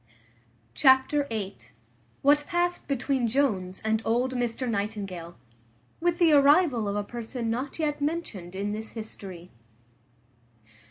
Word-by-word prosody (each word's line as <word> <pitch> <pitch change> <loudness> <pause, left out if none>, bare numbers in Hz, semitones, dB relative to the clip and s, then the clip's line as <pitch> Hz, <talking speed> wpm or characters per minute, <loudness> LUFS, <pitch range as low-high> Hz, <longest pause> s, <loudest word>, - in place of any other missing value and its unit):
Chapter 265 - +4
viii. 215 -6 -4 0.7
What 290 +1 +4
passed 350 0 -1
between 265 -2 0
Jones 210 -8 0
and 220 0 +1
old 245 +3 +1
Mr 245 0 -2
Nightingale; 200 -6 -4 0.6
with 345 0 +1
the 335 -3 +5
arrival 285 - +5
of 200 - -1
a 205 - 0
person 235 +1 -4
not 255 +4 -3
yet 300 -2 -1
mentioned 285 - -3
in 200 +2 -2
this 220 +1 -5
history. 195 -6 -8
240 Hz, 120 wpm, -27 LUFS, 205-285 Hz, 0.7 s, the